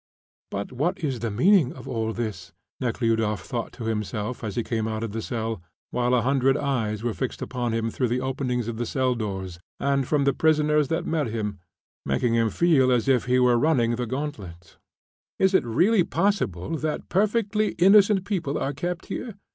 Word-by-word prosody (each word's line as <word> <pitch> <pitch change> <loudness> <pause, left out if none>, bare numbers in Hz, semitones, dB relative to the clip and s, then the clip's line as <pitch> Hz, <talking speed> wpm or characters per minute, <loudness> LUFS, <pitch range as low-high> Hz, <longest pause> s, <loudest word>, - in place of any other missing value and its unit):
"But 100 +4 -4
what 165 +9 -2
is 135 -5 -1
the 115 +1 -2
meaning 140 - +4
of 130 - -11
all 110 -1 -2
this?" 105 -6 -5 0.3
Nekhludoff 115 -5 0
thought 120 -2 -4
to 120 - -8
himself 110 +2 -3
as 105 -3 -4
he 120 - 0
came 110 -2 -2
out 110 0 -3
of 115 - -3
the 115 +2 -3
cell, 115 -4 -3 0.3
while 125 0 +1
a 120 - +2
hundred 135 0 +2
eyes 115 -7 -1
were 120 -2 -1
fixed 130 +2 -4
upon 120 -2 -3
him 115 0 -1
through 125 - 0
the 120 +2 0
openings 125 -2 -2
of 115 -1 -4
the 120 0 -2
cell 130 -1 +1
doors 95 -6 -5 0.2
and 140 -2 +1
from 145 -2 +2
the 140 0 +3
prisoners 150 -1 +3
that 165 +3 -1
met 155 -5 0
him, 105 -3 -3 0.4
making 70 - 0
him 115 -1 +2
feel 140 -3 +3
as 120 -1 +2
if 130 -3 +3
he 125 0 +2
were 125 -1 +4
running 125 -6 +2
the 125 0 -3
gauntlet. 105 - -6 0.6
"Is 190 0 +3
it - - +4
really 175 - +3
possible 165 - -1
that 155 0 -3
perfectly 215 +1 +1
innocent 195 +1 +5
people 170 -9 -2
are 140 - -2
kept 175 +4 -4
here?" 225 -5 -5
125 Hz, 190 wpm, -25 LUFS, 115-150 Hz, 0.6 s, innocent